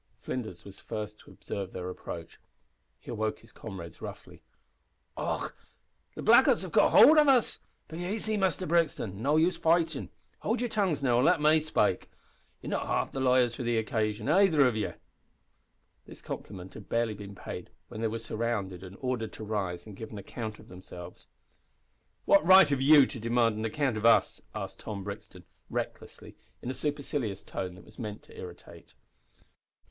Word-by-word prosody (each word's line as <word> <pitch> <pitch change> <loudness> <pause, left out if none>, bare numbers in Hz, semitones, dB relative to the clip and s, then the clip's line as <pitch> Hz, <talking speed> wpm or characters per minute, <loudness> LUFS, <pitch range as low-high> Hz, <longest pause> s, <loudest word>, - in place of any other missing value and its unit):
Flinders 125 -4 -5
was 100 -1 -11
first 105 0 -6
to - - -17
observe 95 -2 -6
their 90 0 -5
approach. 85 -2 -8 0.6
He - - -10
awoke 110 -2 -1
his 115 - -17
comrades 95 -7 -9
roughly. - - -9 0.7
"Och! - - -3 0.6
the - - -6
blackguards - - +6
have - - -6
got - - +4
howld 310 +1 +9
of 300 - +5
us. 260 -4 +3 0.3
Be 165 +2 -6
aisy, 215 +2 -1
Muster 190 -3 0
Brixton. 155 - 0
No 140 +5 +2
use 165 +2 +3
fightin'. 165 -3 +1 0.3
Howld 230 +3 0
yer 245 - +1
tongues, 195 - 0
now, 120 -2 +3
an' 125 - +3
let 175 -1 +4
me 155 +1 +5
spake. 155 0 0 0.5
Yer - - -5
not - - -1
half - - -1
liars 130 -2 +3
enough - - -8
for - - -4
the 120 -1 0
occasion, 110 -1 -1
aither 160 -3 +5
of 125 -3 +2
ye." 110 - -2 1.1
This - - -12
compliment 95 -2 -7
had 100 - -11
barely 115 -1 +1
been 100 -1 -9
paid - - -7 0.2
when 110 - -7
they 115 - +1
were 110 +1 -3
surrounded 110 -5 -3
and 95 +1 -10
ordered 125 -4 -2
to - - -8
rise 95 -5 -3
and 105 -2 -10
give 110 +2 -8
an 105 - -8
account 110 +2 -6
of - - -16
themselves. 90 -1 -11 1.0
"What 200 - +5
right 190 -1 +8
have 140 -2 0
you 145 0 +8
to 125 - -7
demand 115 0 +2
an 110 - -2
account 130 0 0
of 110 +2 +3
us?" 115 - +4
asked - - -6
Tom 100 -3 -6
Brixton, 100 +1 -8 0.3
recklessly, - - -6 0.2
in 125 - -4
a - - -4
supercilious 140 -8 -3
tone 90 -1 -5
that 95 - -15
was 110 - -16
meant 105 -3 -6
to - - -16
irritate. - - -11
115 Hz, 180 wpm, -29 LUFS, 105-150 Hz, 1.1 s, howld